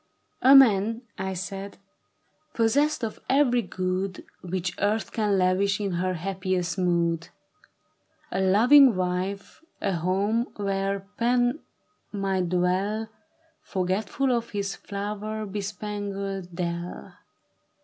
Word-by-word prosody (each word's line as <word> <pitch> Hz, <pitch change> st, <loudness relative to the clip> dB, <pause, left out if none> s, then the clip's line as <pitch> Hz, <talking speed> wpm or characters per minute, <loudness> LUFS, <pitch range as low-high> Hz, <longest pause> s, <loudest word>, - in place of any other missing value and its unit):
" -, -, -44 dB
A 265 Hz, +2 st, +8 dB
man," 225 Hz, -2 st, +5 dB, 0.2 s
I 190 Hz, 0 st, -2 dB
said, 195 Hz, +2 st, -6 dB, 0.4 s
" 310 Hz, 0 st, -43 dB
possessed 275 Hz, +5 st, +2 dB
of 220 Hz, -, -3 dB
every 260 Hz, -3 st, +4 dB
good 185 Hz, -1 st, -3 dB, 0.2 s
Which 180 Hz, 0 st, -3 dB
earth 210 Hz, +2 st, 0 dB
can 210 Hz, -2 st, 0 dB
laWsh 190 Hz, +2 st, +2 dB
in 200 Hz, -2 st, -2 dB
her 180 Hz, +1 st, -1 dB
happiest 185 Hz, 0 st, -2 dB
mood; 170 Hz, -2 st, +1 dB, 1.0 s
A 190 Hz, -, 0 dB
lo\Tng 240 Hz, +7 st, +6 dB
wife, 185 Hz, +6 st, -3 dB, 0.2 s
a 195 Hz, -, -1 dB
home 200 Hz, +7 st, 0 dB
where 195 Hz, -1 st, -1 dB, 0.2 s
Pan 245 Hz, +3 st, +2 dB, 0.5 s
might 195 Hz, -3 st, -1 dB
dwell 190 Hz, +5 st, 0 dB, 0.5 s
Forgetful 200 Hz, +8 st, -1 dB
of 235 Hz, 0 st, -3 dB
his 200 Hz, -1 st, -3 dB
flower 210 Hz, +2 st, -5 dB
bespangled 200 Hz, -1 st, -4 dB
dell. 170 Hz, 0 st, -4 dB
195 Hz, 110 wpm, -26 LUFS, 185-220 Hz, 1.0 s, A